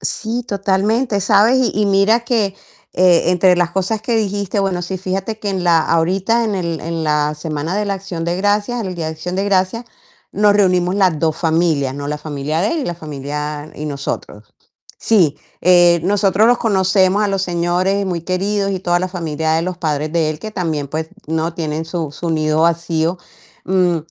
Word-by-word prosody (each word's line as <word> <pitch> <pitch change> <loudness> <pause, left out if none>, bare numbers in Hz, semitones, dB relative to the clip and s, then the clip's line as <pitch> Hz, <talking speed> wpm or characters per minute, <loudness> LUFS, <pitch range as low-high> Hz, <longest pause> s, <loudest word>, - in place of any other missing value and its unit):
Sí, 230 +2 -3
totalmente, 200 +3 0
¿sabes? 210 +6 +4 0.2
Y 210 - +1
y - - +2
mira 200 +4 +3
que, 225 -5 0 0.4
eh, 180 -2 +4
entre 180 0 +4
las 175 -1 +1
cosas 195 +4 -1
que 230 +1 -1
dijiste, 205 -1 -1
bueno, 195 -3 0
sí, 185 +2 -4
fíjate 195 +4 -3
que 205 - -3
en 190 -2 -2
la 170 -2 +4
ahorita 190 +9 +1
en 215 -3 -1
el 170 -4 -3
en 165 0 -3
la 150 0 +1
semana 155 +3 -4
de 210 - 0
la 200 - -1
Acción 185 -3 -6
de 170 +1 -1
Gracias, 205 +5 0
el 185 -3 -4
día 165 -2 -4
de 160 - -3
Acción 175 +4 -5
de 195 - 0
Gracias, 200 +4 0 0.5
nos 205 0 +3
reunimos 180 -3 +2
las 185 -6 +2
2 160 -1 0
familias, 160 -5 +1
¿no? 145 0 -5
La 150 - -2
familia 150 +1 -3
de 200 - +1
él 330 - -1
y 275 - -3
la 175 - -2
familia 150 -1 -5
y 150 - -6
nosotros 140 -7 -6 0.5
sí, 170 -10 +3 0.2
eh, 175 -1 +5
nosotros 200 +2 +3
los 245 0 +3
conocemos 190 -1 +2
a 210 - +1
los 195 -1 -1
señores 180 +2 0
muy 175 -3 -2
queridos 195 +3 -1
y 190 - -2
toda 175 -1 +1
la 185 - -1
familia 160 -3 -2
de 165 +1 +1
los 185 0 -3
padres 155 -2 -1
de 160 -2 +1
él, 155 - -4
que 215 +7 -7
también, 160 -7 -2
pues, 155 +3 -4 0.2
¿no? 160 +2 -2
Tienen 160 -1 -3
su 165 -3 -4
su 170 +3 -5
nido 155 -1 +1
vacío, 165 +1 +1 0.5
mm, 180 -2 +2
180 Hz, 200 wpm, -18 LUFS, 160-200 Hz, 0.5 s, eh